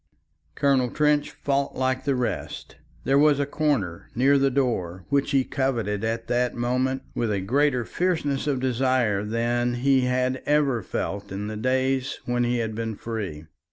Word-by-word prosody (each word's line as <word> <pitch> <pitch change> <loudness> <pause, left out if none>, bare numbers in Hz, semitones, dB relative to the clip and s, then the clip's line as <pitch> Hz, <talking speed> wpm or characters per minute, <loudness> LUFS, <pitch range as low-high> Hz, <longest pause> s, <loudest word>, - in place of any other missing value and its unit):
Colonel 135 -3 +2
Trench 150 +2 +2
fought 140 -1 -1
like 130 0 -1
the 140 -2 +2
rest. 125 -2 -4 0.3
There 135 +1 +3
was 145 -1 +4
a 140 - +1
corner 140 - -1
near 135 +3 +4
the 135 0 +3
door 95 -10 -1
which 140 0 +1
he 135 -2 +3
coveted 115 -7 -1
at 115 +1 -2
that 125 0 0
moment 130 +2 0
with 115 -2 -1
a 100 - 0
greater 125 +4 +1
fierceness 150 -6 -1
of 140 -3 +1
desire 125 -5 +1
than 120 +2 0
he 135 +2 +3
had 125 +1 0
ever 145 -5 +2
felt 100 +1 -4
in 100 +2 -4
the 110 +1 -4
days 130 +3 0
when 120 0 0
he 120 0 +1
had 110 -2 -2
been 110 0 -3
free. 100 -9 -5
125 Hz, 165 wpm, -25 LUFS, 115-140 Hz, 0.3 s, was